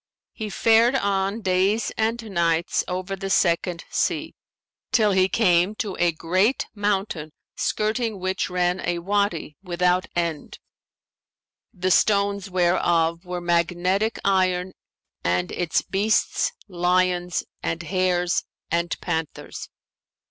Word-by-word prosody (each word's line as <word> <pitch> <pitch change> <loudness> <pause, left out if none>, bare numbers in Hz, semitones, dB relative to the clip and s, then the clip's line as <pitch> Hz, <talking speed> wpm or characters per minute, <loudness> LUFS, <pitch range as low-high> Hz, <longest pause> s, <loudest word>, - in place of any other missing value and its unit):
He 220 -2 -5
fared 230 +4 +4
on 200 -1 0
days 190 +4 +1
and 225 +2 0
nights 170 -2 +1
over 185 +2 -3
the 195 0 -5
Second 170 -2 +1
Sea, - - -1 0.6
till 215 -3 +4
he 190 0 +3
came 185 -2 +3
to 205 -3 -3
a 175 0 +3
great 185 - +1
mountain 195 -7 -2 0.2
skirting 215 -1 -1
which 185 +1 -1
ran 180 0 0
a 175 - -1
Wady 180 -5 -1
without 180 0 +1
end, 170 -3 -2 1.1
the 185 +1 -1
stones 200 0 +2
whereof 175 -1 +1
were 180 0 -4
magnetic 175 +5 +1
iron 185 -1 +1 0.5
and 90 0 0
its 175 -2 0
beasts, 205 +3 +1 0.2
lions 180 -1 +1 0.2
and 165 +1 -3
hares 180 0 +1 0.3
and 170 +1 -1
panthers. 160 -3 -4
185 Hz, 110 wpm, -24 LUFS, 175-200 Hz, 1.1 s, fared